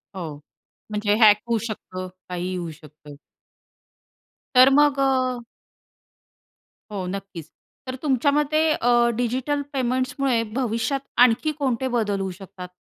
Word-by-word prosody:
हो, 165 -5 -5 0.6
म्हणजे 210 0 +1
हॅक 210 -2 +8
होऊ 235 -1 +1
शकतं, 185 -4 -6 0.2
काहीही 180 +1 -3
होऊ 175 -2 -4
शकतं. 150 -1 -14 1.4
तर 255 +1 +8
मग 290 -1 +4
अ 255 -2 +1 1.5
हो 195 -3 -4
नक्कीच. 195 -4 -7 0.4
तर 255 - -4
तुमच्या 280 -1 +2
मते 295 +1 +1
अ, 240 -4 +3
डिजिटल 255 +5 -1
पेमेंट्समुळे 255 -1 0
भविष्यात 245 +2 -1 0.3
आणखी 250 +6 +1
कोणते 265 -2 0
बदल 205 -3 0
होऊ 190 -1 -3
शकतात, 190 -1 -9
235 Hz, 115 wpm, -23 LUFS, 195-265 Hz, 1.5 s, हॅक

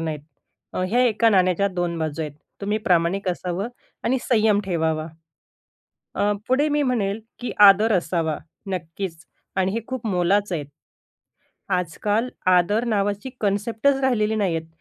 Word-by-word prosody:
नाही. 160 -2 -3 0.7
ह्या 240 +5 +2
एका 230 0 +3
नाण्याच्या 185 0 +3
2 175 -2 -2
बाजू 155 -1 -3
आहेत. 150 -2 -5 0.3
तुम्ही 210 +2 -1
प्रामाणिक 185 0 +1
असावं 180 +3 -2 0.4
आणि 260 +2 +2
संयम 215 -4 +3
ठेवावा. 160 -4 -1 1.1
अ, 205 +1 +2 0.2
पुढे 275 +4 +3
मी 295 0 +1
म्हणेल, 225 -6 0 0.2
की 245 - -4
आदर 210 +3 +6
असावा. 165 -4 0 0.3
नक्कीच 180 0 -4 0.4
आणि 190 0 +1
हे 230 - -1
खूप 260 -3 -5
मोलाचं 195 0 +1
आहेत. 150 -4 -3 1.0
आजकाल 200 +6 0 0.3
आदर 205 +6 +2
नावाची 205 +1 -1
कॉन्सेप्टच 220 +6 +1
राहिलेली 220 -5 +1
नाहीहेत. 175 -7 -1
200 Hz, 130 wpm, -23 LUFS, 175-220 Hz, 1.1 s, आदर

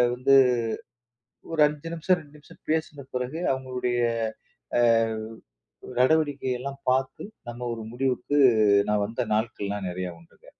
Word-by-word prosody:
வந்து 135 +2 +4 1.2
ஒரு 160 - 0
5 150 +2 -5
நிமிஷம் 180 +2 +2
2 150 -1 -17
நிமிஷம் 145 - -18
பேசுன 155 -3 -2
பிறகு 125 +5 -3
அவங்களுடைய 125 -2 -2 0.8
அ - - +4 1.2
நடவடிக்கையெல்லாம் 140 -2 +1
பார்த்து 130 0 0 0.3
நம்ம 120 +1 -6
ஒரு 115 - -7
முடிவுக்கு 130 +2 0 0.5
நான் 105 -1 +2
வந்த 115 +2 -3
நாட்கள்லாம் 105 -3 -2
நெறைய 90 0 -4
உண்டுங்க. 85 - -22
130 Hz, 115 wpm, -26 LUFS, 120-145 Hz, 1.2 s, வந்து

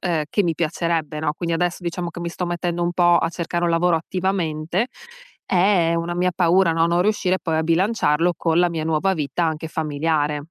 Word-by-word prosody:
ehm, 165 -5 -1
che 205 - +2
mi 165 -2 0
piacerebbe, 165 -1 -2
no 150 -1 0
quindi 170 0 -2
adesso, 175 +1 -1
diciamo 175 0 -3
che 175 - -9
mi 170 - -3
sto 180 - -4
mettendo 175 0 -2
un 175 0 0
po' 175 -1 +4
a - - 0
cercare 175 0 -3
un 170 - +1
lavoro 165 0 +2
attivamente, 180 +2 -2 0.6
è 180 -3 +3
una 170 +1 -2
mia 180 +1 +1
paura, 180 0 +3
no, 165 0 +2
non 170 +1 +2
riuscire 195 -3 +1
poi, 160 -2 -1
a 160 - +1
bilanciarlo 170 -1 +2
con 165 0 +1
la 175 0 +4
mia 160 -2 -3
nuova 160 +4 +1
vita 155 +1 -2
anche 160 0 -3
familiare. 150 -1 -1
170 Hz, 205 wpm, -22 LUFS, 160-180 Hz, 0.6 s, po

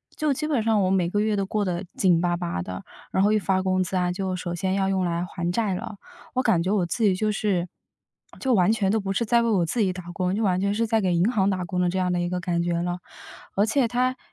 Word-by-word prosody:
就 305 -2 0
基 305 +3 -3
本 280 -8 +1
上 220 -2 +2
我 185 - +2
每 180 -3 +2
个 205 - 0
月 215 0 +1
都 200 -1 0
过 205 +1 -1
得 180 0 -2
紧 175 -3 +3
巴 175 0 +1
巴 170 - -3
的， 90 +1 -6 0.3
然 190 - +1
后 210 +1 +4
一 - - +4
发 190 -1 +1
工 185 0 +1
资 185 +1 -2
啊， 180 -1 +1
就 190 0 -2
首 175 -1 -4
先 185 +2 -1
要 195 -1 +1
用 190 -1 +1
来 170 0 -1
还 175 -1 -3
债 205 +1 0
了。 200 +3 -6 0.4
我 255 - +2
感 175 -9 +2
觉， 185 - 0
我 195 -4 +2
自 225 +7 -2
己 200 -3 +5
就 215 +3 0
是， 195 -4 0 0.7
就 260 -2 +1
完 185 -2 +4
全 215 -4 +1
都 220 - +2
不 195 0 -3
是 215 +4 0
在 235 +1 +3
为 235 - +1
我 190 -6 +2
自 225 +8 -1
己 195 -3 +2
打 180 -1 -8
工， 185 0 -1
就 210 - -1
完 185 -4 +1
全 200 +1 +1
是 225 +2 0
在 220 0 +2
给 185 -3 +1
银 175 +5 +3
行 200 -5 +2
打 185 -2 -1
工 180 0 -2
的 180 - +2
这 190 +2 -1
样 180 -1 +1
的 175 - 0
一 175 - -1
个 180 0 -2
感 175 -1 -1
觉 170 0 0
了。 175 0 -2 0.6
而 200 - +3
且 245 +3 +2
它 250 +2 0
190 Hz, 310 characters per minute, -25 LUFS, 180-215 Hz, 0.7 s, 己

